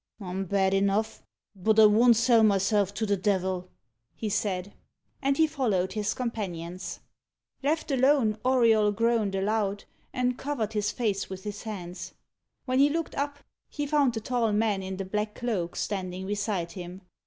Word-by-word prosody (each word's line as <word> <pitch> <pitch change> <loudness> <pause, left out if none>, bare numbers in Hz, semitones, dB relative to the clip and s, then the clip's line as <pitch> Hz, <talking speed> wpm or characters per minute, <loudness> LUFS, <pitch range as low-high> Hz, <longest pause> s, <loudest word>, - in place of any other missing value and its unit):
"I'm 190 -1 -4
bad 190 0 +1
enough 200 +3 +1 0.3
but 215 +3 +2
I 220 - +9
won't 230 +3 +6
sell 230 0 +4
myself 200 -1 +3
to 220 - -1
the 205 -1 +2
devil," 185 -2 -1 0.5
he 220 - -3
said. 200 -2 -2 0.5
And 275 0 +1
he 320 - +5
followed 235 - 0
his 210 -1 -1
companions. 185 -7 -5 0.6
Left 300 +2 -1
alone, 260 -5 +3
Auriol 230 -5 +4
groaned 225 -3 +1
aloud, 200 0 0 0.3
and 250 0 -1
covered 235 -7 -2
his 210 -1 0
face 210 -5 -1
with 190 0 -7
his 205 -1 -6
hands. 180 -5 -7 0.5
When 255 0 +1
he 285 +1 +6
looked 325 +1 -2
up, 285 0 -3 0.3
he 290 - -3
found 285 -4 +2
the 225 - -3
tall 235 -1 0
man 210 -2 +1
in 190 0 -5
the 195 - -4
black 210 +2 -2
cloak 205 -8 -2
standing 185 -2 -3
beside 200 -4 -2
him. 180 0 -8
210 Hz, 160 wpm, -27 LUFS, 195-240 Hz, 0.6 s, I